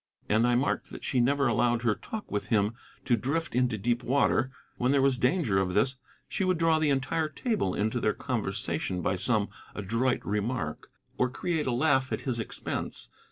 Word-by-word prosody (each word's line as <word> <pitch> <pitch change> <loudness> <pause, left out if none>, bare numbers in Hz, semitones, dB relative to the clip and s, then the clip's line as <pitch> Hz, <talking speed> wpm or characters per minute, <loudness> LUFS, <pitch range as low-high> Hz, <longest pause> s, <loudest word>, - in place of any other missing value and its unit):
And 110 +3 +3
I 120 - +3
marked 130 +4 0
that - - -9
she 130 - 0
never 140 +3 +3
allowed 120 0 +2
her 115 -3 +3
talk 215 - -7
with 105 - -2
him 105 0 +2 0.3
to 120 - +4
drift 145 +9 -2
into 125 -2 +1
deep 120 +4 0
water; 130 0 +2 0.3
when 125 +2 +2
there 140 - +4
was 135 -3 +3
danger 125 - +2
of 90 -1 -1
this 130 +5 +2 0.3
she - - -2
would 185 -1 +2
draw 165 -1 +3
the 155 -1 +2
entire 140 +3 0
table 190 - -1
into 110 +4 0
their 105 -2 +1
conversation 95 -6 -2
by 95 - +1
some 105 +2 +2 0.3
adroit 115 +6 0
remark, 105 +5 -2 0.3
or 125 - +3
create 155 +4 -2
a - - +1
laugh 130 0 +2
at - - -1
his 125 -3 -2
expense. 115 - -4
125 Hz, 190 wpm, -29 LUFS, 110-140 Hz, 0.3 s, to